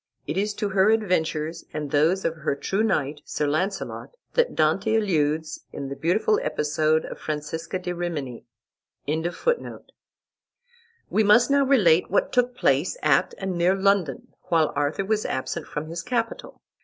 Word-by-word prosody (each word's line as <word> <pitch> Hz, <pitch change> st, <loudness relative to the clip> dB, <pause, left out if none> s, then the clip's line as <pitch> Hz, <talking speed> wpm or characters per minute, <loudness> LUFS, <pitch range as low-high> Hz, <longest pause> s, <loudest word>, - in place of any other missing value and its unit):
It 150 Hz, -, -3 dB
is 205 Hz, +2 st, -1 dB
to 205 Hz, -, -2 dB
her 190 Hz, +1 st, +3 dB
adventures, 170 Hz, -6 st, 0 dB
and 150 Hz, -2 st, -4 dB
those 165 Hz, +6 st, +2 dB
of 165 Hz, 0 st, -1 dB
her 140 Hz, -2 st, -1 dB
true 195 Hz, +8 st, -1 dB
knight, 150 Hz, -9 st, 0 dB
Sir 150 Hz, -, -2 dB
Launcelot, 185 Hz, +7 st, -2 dB, 0.2 s
that 485 Hz, 0 st, +1 dB
Dante 190 Hz, +8 st, +2 dB
alludes 160 Hz, -7 st, 0 dB
in 140 Hz, -1 st, -6 dB
the 140 Hz, -, -5 dB
beautiful 180 Hz, +9 st, +1 dB
episode 155 Hz, +1 st, +1 dB
of -, -, -8 dB
Francesca 160 Hz, +4 st, -4 dB
di 180 Hz, -1 st, -4 dB
Rimini.] 155 Hz, -9 st, -4 dB, 2.7 s
We 220 Hz, -, +3 dB
must 230 Hz, +5 st, +5 dB
now 280 Hz, 0 st, +4 dB
relate 185 Hz, -11 st, +4 dB
what 200 Hz, -, +1 dB
took 250 Hz, 0 st, +2 dB
place -, -, +1 dB
at -, -, +3 dB
and 190 Hz, -2 st, -3 dB
near 175 Hz, +2 st, +3 dB
London, 195 Hz, -8 st, +1 dB, 0.2 s
while 160 Hz, -3 st, +2 dB
Arthur 145 Hz, +7 st, -1 dB
was 215 Hz, +1 st, 0 dB
absent 140 Hz, +5 st, -3 dB
from 150 Hz, +1 st, -4 dB
his 170 Hz, +1 st, -5 dB
capital. 230 Hz, +2 st, -3 dB
175 Hz, 150 wpm, -24 LUFS, 155-205 Hz, 2.7 s, must